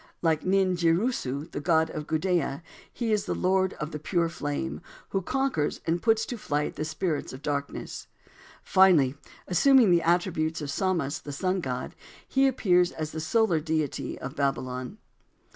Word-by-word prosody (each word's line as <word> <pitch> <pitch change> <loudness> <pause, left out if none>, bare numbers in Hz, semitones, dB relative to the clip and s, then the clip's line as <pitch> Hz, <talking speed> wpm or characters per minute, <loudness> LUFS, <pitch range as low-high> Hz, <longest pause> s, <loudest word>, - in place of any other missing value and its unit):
Like 160 -2 +2
Nin 190 -1 +2
Girsu, 165 - 0
the - - -4
god 160 0 +2
of 150 0 -6
Gudea, 160 -3 0 0.3
he 235 -2 -2
is 210 -2 +1
the - - -2
"Lord 190 0 +1
of 155 +1 -5
the 150 - -5
pure 170 +2 0
flame, 145 0 -4 0.3
who 195 - -1
conquers 260 - -1
and 170 +1 0
puts 225 -1 +3
to 240 - -6
flight 150 -5 -2
the 155 - -3
spirits 155 -2 -2
of 130 +3 -10
darkness." 145 -1 -4 0.6
Finally 175 -9 +5 0.3
assuming 230 +4 +5
the 170 -1 +4
attributes 165 -2 +1
of 145 -2 -4
Samas, 160 -4 -1
the 145 - -7
Sun 185 +6 -1
God, 130 +2 -4 0.3
he 270 0 +3
appears 180 -9 +3
as 155 -1 -5
the 160 - -4
solar 205 -1 +2
deity 155 -2 -2
of 135 +2 -7
Babylon. 130 +2 -2
165 Hz, 160 wpm, -27 LUFS, 150-190 Hz, 0.6 s, Finally